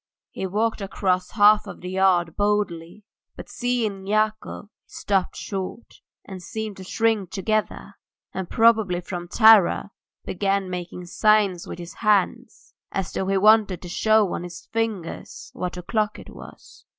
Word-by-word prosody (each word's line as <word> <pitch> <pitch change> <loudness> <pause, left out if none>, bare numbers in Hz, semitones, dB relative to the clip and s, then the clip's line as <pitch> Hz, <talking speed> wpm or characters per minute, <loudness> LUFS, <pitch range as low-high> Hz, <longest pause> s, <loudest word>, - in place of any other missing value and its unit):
He 190 - -4
walked 220 +3 -1
across 185 -2 -1
half 210 0 +5
the 180 - -9
yard 185 -3 +2
boldly, 205 -3 -1 0.3
but - - -10
seeing 225 -6 -2
Yakov 215 0 -1
he - - -29 0.2
stopped 195 -3 -1
short, 195 +3 -6 0.2
and 190 -2 -9
seemed 215 +2 -6
to 190 - -9
shrink 220 -1 0
together, 215 +2 -2 0.4
and 190 -2 -5
probably 220 -6 +3
from 175 0 -6
terror, 215 -1 +5 0.3
began 195 0 -1
making 180 0 -6
signs 200 -1 +2
with - - -7
his 175 -1 -9
hands 210 -4 -1 0.2
as 195 -1 -3
though 190 - -2
he 195 0 +1
wanted 210 -2 +4
to 175 - -8
show 215 +1 +2
on - - -3
his 175 -1 -9
fingers 220 -7 -4
what 180 0 -5
o'clock 210 +4 -1
it - - -12
was. - - -14
195 Hz, 145 wpm, -23 LUFS, 180-215 Hz, 0.4 s, half